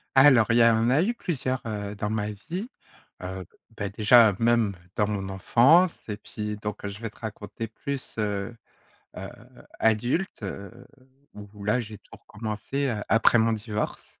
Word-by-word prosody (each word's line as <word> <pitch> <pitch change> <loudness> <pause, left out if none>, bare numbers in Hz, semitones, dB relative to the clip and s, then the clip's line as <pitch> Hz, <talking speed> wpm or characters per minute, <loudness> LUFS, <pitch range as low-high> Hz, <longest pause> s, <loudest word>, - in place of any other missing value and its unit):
Alors 135 -5 +7
il 115 - +4
y 120 - +6
a 115 -1 +6
en 115 +2 +2
a 145 +6 +4
eu 235 +5 0
plusieurs, 130 - -2
heu, 105 -2 -4
dans 105 +1 -3
ma 105 -1 -1
vie. 180 - -6 0.5
Heu, 95 0 -5 0.3
beh, 100 -1 -3
déjà 110 0 +6
même, 115 -3 +2 0.2
dans 105 - +2
mon 100 -2 -3
enfance, 135 - +4 0.2
et 105 - -3
puis 105 0 -5
donc 105 0 -5
je 100 +1 -6
vais 115 - -4
te - - -23
raconter 110 0 -6
plus, 140 +4 -6
heu, 105 +1 -2 0.6
heu, 95 +1 -6 0.5
adulte, 120 - 0
heu, 100 0 -6 0.6
où 105 0 -11
là, 115 +5 +2
j'ai 110 -2 -8
tout - - -30
recommencé, 110 +6 -4
heu, 110 -4 -2
après 115 +2 +5
mon 115 0 +3
divorce, 110 -1 -4
110 Hz, 170 wpm, -26 LUFS, 105-120 Hz, 0.6 s, Alors